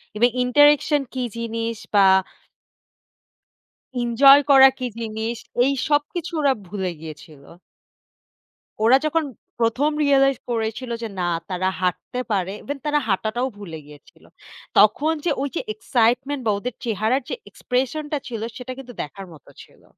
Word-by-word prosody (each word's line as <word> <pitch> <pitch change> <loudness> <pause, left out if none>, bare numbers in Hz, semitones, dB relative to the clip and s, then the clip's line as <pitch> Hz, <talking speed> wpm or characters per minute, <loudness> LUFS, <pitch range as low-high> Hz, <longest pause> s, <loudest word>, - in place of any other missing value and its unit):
eve 240 +3 +4 0.2
interaction 290 +3 +4
কি 255 -1 -2
জিনিস, 230 0 -3 0.2
বা 200 -1 +6 2.0
ইনজয় 275 +4 +6
করা 270 -1 +9
কি 255 - -3
জিনিস, 225 +1 -4 0.3
এই 275 - +2 0.2
সবকিছু 300 +4 -1
ওরা 280 -2 +3
ভুলে 190 -1 -3
গিয়েছিল! 155 -2 -11 1.4
ওরা 250 +4 +7
যখন 320 +1 +1 0.4
১ম 250 +7 +2
realize 275 -2 +3
করেছিল 230 +2 -3
যে, 225 - -3
"না! 175 - 0 0.2
তারা 185 +1 0
হাঁটতে 185 +7 -2
পারে!" 190 -1 -1
even 285 0 -4
তারা 295 0 +2
হাঁটাটাও 220 +6 0
ভুলে 165 -6 -8
গিয়েছিল। 150 -1 -17 0.5
তখন 275 +10 +4
যে - - +1
ওই 280 - -1
যে - - 0
excitement 250 +5 +1
বা - - +3
ওদের 245 +2 -5
চেহারার 225 +4 0
যে - - -2 0.2
expression 265 +4 -2
টা 295 - +1
ছিল, 230 -3 -5 0.2
সেটা 255 0 -6
কিন্তু 250 -2 -9
দেখার 190 +6 -9
মত 150 - -16 0.2
ছিল! - - -21
240 Hz, 140 wpm, -22 LUFS, 210-275 Hz, 2.0 s, করা